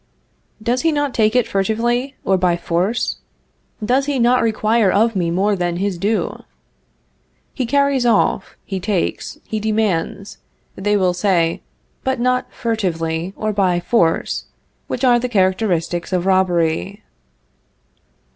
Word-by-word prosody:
Does 245 +2 +1
he 325 - +2
not 290 -3 -1
take 215 +1 +2
it 250 -3 +3
furtively, 240 +7 0
or 195 - +3
by 180 -2 +2
force? 175 +7 -1 0.7
Does 265 +4 +1
he 285 -2 0
not 245 +1 +3
require 220 -1 +2
of 225 +2 +2
me 175 -3 0
more 195 +4 +1
than 175 -2 -2
his 195 +1 -1
due? 210 +4 -1 1.1
He 255 -4 -2
carries 280 0 +2
off, 220 -4 +1
he 195 -2 -4
takes, 190 -1 -2
he 215 - -4
demands, 210 -3 -1 0.4
they 205 +2 +1
will 185 -2 +2
say, 175 -3 +1 0.4
but 265 -2 -1
not 250 +1 0
furtively 175 -7 -2
or 215 0 -2
by 185 -3 +2
force, 170 -3 0 0.4
which 250 - -4
are 245 -2 +5
the 250 +1 -3
characteristics 185 -4 0
of 180 -1 0
robbery. 185 +1 +1
205 Hz, 135 wpm, -19 LUFS, 180-240 Hz, 1.1 s, are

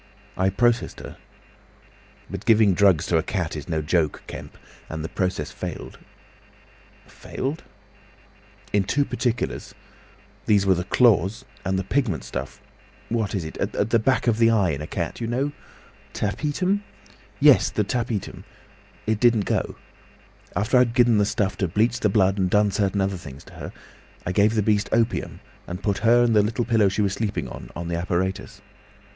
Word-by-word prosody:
"I 95 +1 +2
processed 120 +4 +1
her. - - -9 1.1
But 100 +1 -7
giving 110 -3 +5
drugs 90 -4 +4
to 85 - +2
a - - +1
cat 90 -2 -3
is 75 +3 -7
no 80 -2 -1
joke, 80 -1 0
Kemp! - - -9 0.3
And 80 -1 -5
the 80 - -4
process 90 -6 -2
failed." - - -7 1.1
"Failed!" 145 +6 -5 1.1
"In 100 -1 +3
two 140 +9 +1
particulars. 120 -4 -2 0.7
These 100 -2 +4
were 95 - +5
the 90 0 -2
claws 100 -4 +3 0.2
and 95 +1 0
the 95 - -1
pigment 115 - -1
stuff, - - -6 0.5
what 110 -3 -1
is 90 -5 -2
it?—at 100 +6 -2
the 115 - +4
back 130 +4 +1
of 115 -2 +2
the 115 0 +5
eye 100 -6 +3
in 70 -1 -4
a 75 - -5
cat. 85 +6 -4
You 115 - -2
know?" 130 +5 -1 0.6
"Tapetum." 150 - -1 0.6
"Yes, 140 -9 +6
the 105 - 0
tapetum. 115 -1 -3 0.6
It 110 -1 0
didn't 115 -4 +3
go. - - -1 0.8
After 115 +5 +3
I'd 120 -1 +2
given 120 -4 +4
the 105 - +3
stuff 100 -1 -1
to 95 - 0
bleach 110 +7 +1
the 105 - +2
blood 95 0 +2
and 95 -1 +1
done 105 +1 +3
certain 100 0 0
other 95 0 -1
things 70 -5 -11
to - - -16
her, - - -8 0.5
I 90 - -1
gave 105 +4 +3
the 105 - +2
beast 105 -1 +1
opium, 115 +1 0 0.3
and 90 +3 -6
put 100 -2 0
her 120 +1 +5
and 115 -2 +2
the 105 +3 +2
pillow 110 -4 +3
she 100 +2 0
was 100 -1 0
sleeping 105 -1 -2
on, - - -9
on 85 0 -5
the 85 0 -2
apparatus. 90 +2 -3
105 Hz, 170 wpm, -24 LUFS, 95-115 Hz, 1.1 s, Yes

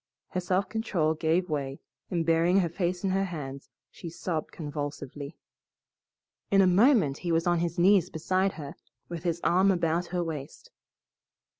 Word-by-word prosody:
Her 185 - -2
self 185 +2 0
control 190 -9 0
gave 165 +3 +1
way, 140 -4 -3 0.3
and 170 -3 -1
burying 170 +4 +4
her 170 - 0
face 175 +2 -2
in 195 - +1
her 195 +1 +1
hands, 140 -6 -7 0.2
she 170 - -8
sobbed 165 -1 -4
convulsively. 145 -1 -6 1.1
In 195 - +4
a 195 - +7
moment 185 - +4
he 175 - -2
was 165 0 +2
on 175 -1 +2
his 170 -1 -2
knees 180 0 +4
beside 185 +4 0
her, 145 -2 -7 0.4
with 170 -2 -5
his 170 -1 -1
arm 185 +3 +4
about 175 -1 +1
her 180 -1 -1
waist. 160 - -7
170 Hz, 160 wpm, -28 LUFS, 155-185 Hz, 1.1 s, a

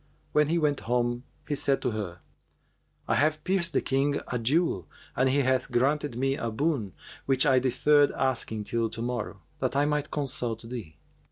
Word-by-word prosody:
When 150 -1 +3
he 165 +3 +1
went 150 -3 +1
home, 120 0 0 0.2
he 150 - -1
said 140 -1 +1
to 125 - +1
her, 95 -6 -5 0.9
'I - - +2
have 155 +1 +1
pierced 185 -2 +1
the - - +2
King 140 +2 +1
a 125 - -1
jewel 120 - +1 0.3
and 130 +1 +3
he 140 +2 +3
hath 130 -1 +1
granted 140 +1 +1
me 135 +2 +1
a 115 - -3
boon 115 - -1 0.3
which 135 -1 +3
I 130 -3 +5
deferred 140 +3 +4
asking 115 -4 -1
till 115 +1 -1
to 115 - -5
morrow, 115 -6 -4 0.2
that 130 0 -1
I 140 +1 +3
might 150 0 0
consult 120 -5 -1
thee. 115 -10 -7
130 Hz, 180 wpm, -28 LUFS, 115-145 Hz, 0.9 s, I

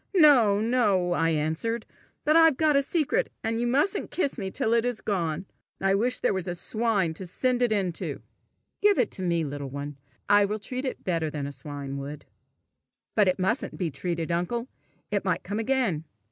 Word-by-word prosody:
"No, 250 - +6
no!" 210 -7 +2
I 165 -2 +2
answered. 160 +9 -1 0.4
"But 305 - +4
I've 325 -4 +6
got 310 -2 +3
a 280 - +5
secret, 335 - 0
and 225 +1 -1
you 240 - +1
mustn't 375 - +1
kiss 285 -7 -1
me 195 -5 -4
till 220 +4 0
it 230 -1 +3
is 245 -2 -1
gone. 175 -4 -2 0.3
I 195 0 +2
wish 245 +5 +2
there - - +2
was 190 -2 -3
a 175 - -2
swine 210 -3 +1
to 185 +3 -8
send 250 +7 0
it 245 -2 +3
into!" 190 -5 -2 0.6
"Give 410 -1 +5
it - - +2
to - - -6
me, 170 -2 +1
little 145 -1 -5
one. 140 +1 -6 0.3
I 205 0 +6
will 210 +2 -2
treat 250 +5 -5
it 260 - -4
better 165 -4 0
than 145 -2 -4
a 140 - -4
swine 140 0 -6
would." 145 +2 -7 0.9
"But 210 -3 +4
it 185 - +2
mustn't 195 +6 -1
be 175 -5 -1
treated, 170 +3 -3
uncle! 180 +9 -1 0.4
It - - 0
might - - 0
come 205 +2 -3
again!" 225 - 0
200 Hz, 195 wpm, -27 LUFS, 165-245 Hz, 0.9 s, No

